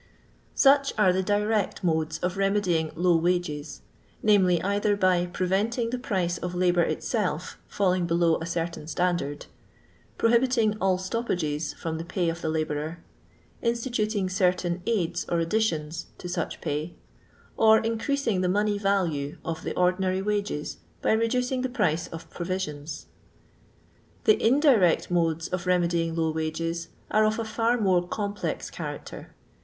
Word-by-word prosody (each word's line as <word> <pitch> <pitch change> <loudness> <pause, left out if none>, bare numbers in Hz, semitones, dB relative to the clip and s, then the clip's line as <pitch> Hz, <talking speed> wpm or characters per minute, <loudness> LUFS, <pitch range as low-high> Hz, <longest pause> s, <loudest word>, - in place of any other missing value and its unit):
Such 275 0 +5
are 190 -4 +4
the 190 - +1
dirtei 205 +1 0
modes 160 -2 0
of 180 +1 0
remedying 195 -5 +1
^low 175 -1 +3
wages^ 160 -4 -1 0.5
viz., 180 -4 +4
either 205 +1 +1
by 185 -2 +2
preventing 205 +7 0
the 250 - -2
price 185 -7 -1
of 180 0 -4
labour 175 -1 +3
itself 180 +1 -2
fidling 185 -3 +1
below 170 -1 +2
a 165 - -5
certain 170 -2 -3
standard; 175 -4 -1 0.7
prohibiting 230 -2 +3
all 190 -1 +3
stoppages 175 -7 -2
from 160 -1 -4
the - - -4
pay 175 0 -1
of 165 +1 -4
the 160 - -1
la 160 0 +1
bourer; 155 +2 -4 0.6
instituting 230 -4 0
certain 180 -2 0
aids 175 -7 0
or 170 - +1
additions 165 -4 -1
to - - -7
such 175 -2 -3
pay; 150 +4 -3 0.6
or 220 0 +6
increasing 225 -1 0
the 180 - +1
money 205 +2 +1
value 175 -8 0
of 165 -1 -3
the - - -4
ordinary 185 +1 +1
wages 205 -7 -2 0.3
by - - +3
reducing 250 +3 +1
the 260 - -1
price 165 - 0
of 165 +1 -9
provisions. 160 -4 -4 1.2
The 435 - +4
indirect 235 - +4
modes 165 -2 +1
of 185 0 -3
remedying 170 -2 +1
low 160 -1 +1
wages 165 +2 -3 0.2
are 215 - +4
of 215 0 +2
a 230 - -1
fitf 230 +2 0
more 185 -4 +2
complex 205 +1 -3
character. - - -7
180 Hz, 140 wpm, -26 LUFS, 165-210 Hz, 1.2 s, or